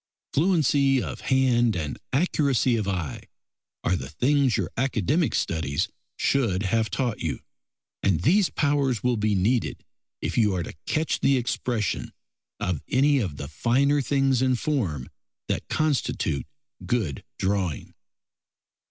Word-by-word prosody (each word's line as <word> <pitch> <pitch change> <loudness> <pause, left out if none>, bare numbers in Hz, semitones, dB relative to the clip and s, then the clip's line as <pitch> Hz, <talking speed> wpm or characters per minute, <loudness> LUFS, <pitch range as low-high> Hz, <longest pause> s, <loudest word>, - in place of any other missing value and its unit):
Fluency 145 -5 +3
of - - -5
hand 125 -4 +3
and 75 -4 -3
accuracy 135 -4 +2
of 105 -3 -1
eye 90 -8 -3 0.6
are 90 - +2
the - - -5
things 140 -1 +2
your 95 -4 -2
academic 135 - +1
studies 75 -4 -1 0.3
should 110 -9 +1
have 110 +2 +1
taught 120 +1 -1
you, 80 - -3 0.6
and 95 -5 +2
these 190 +6 +4
powers 140 -5 +1
will 125 -1 +2
be 105 -1 +1
needed 110 +6 0 0.3
if - - -1
you 105 -4 +3
are 90 - -1
to - - -8
catch 155 +1 0
the 135 -1 +3
expression 120 -3 -2 0.5
of 90 -6 -1
any 140 +2 +3
of 90 - -3
the 70 - -5
finer 135 - +2
things 135 -2 +2
in 130 -1 +3
form 110 - -1 0.4
that - - -2
constitute 145 - 0 0.4
good 110 - -1
drawing. 95 -6 -1
120 Hz, 135 wpm, -25 LUFS, 95-140 Hz, 0.6 s, these